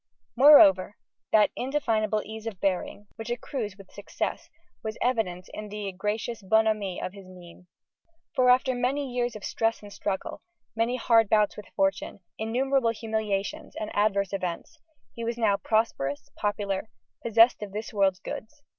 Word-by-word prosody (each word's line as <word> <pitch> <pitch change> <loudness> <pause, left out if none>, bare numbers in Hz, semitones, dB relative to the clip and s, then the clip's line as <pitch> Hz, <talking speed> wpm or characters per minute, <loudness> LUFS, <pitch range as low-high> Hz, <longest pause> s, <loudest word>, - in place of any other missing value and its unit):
Moreover, 210 -9 +7 0.3
that 215 -1 +5
indefinable 225 -6 0
ease 220 +1 -8
of 205 -5 -6
bearing, 195 +1 -2
which 225 0 -6
accrues 240 -4 -4
with 195 -2 -15
success, - - -4 0.3
was 220 0 -5
evident 190 -8 -1
in 210 0 -7
the 205 -1 -4
gracious 210 +4 -3
bonhomie 215 -2 +1
of 185 - -5
his 195 -2 -12
mien. 180 -1 -14 0.7
For, 250 -1 +3
after 255 +1 +4
many 255 +2 -1
years 245 -2 -1
of 210 - -9
stress 225 +1 -1
and 205 -1 -10
struggle, 190 -2 -4 0.3
many 230 +2 +1
hard 225 -3 +3
bouts 210 -1 +3
with 210 - -10
fortune, 195 +1 0 0.2
innumerable 250 +3 +1
humiliations 220 -3 -3
and 215 - -5
adverse 200 -2 +1
events, 185 - -4 0.3
he 235 - -6
was 230 0 -2
now 210 -4 +2
prosperous, 195 -11 -1
popular, 205 0 -2 0.3
possessed 230 +1 +5
of 205 -2 -6
this 215 +3 -6
world's 195 -3 +2
goods. 290 +8 -8
215 Hz, 150 wpm, -27 LUFS, 195-235 Hz, 0.7 s, Moreover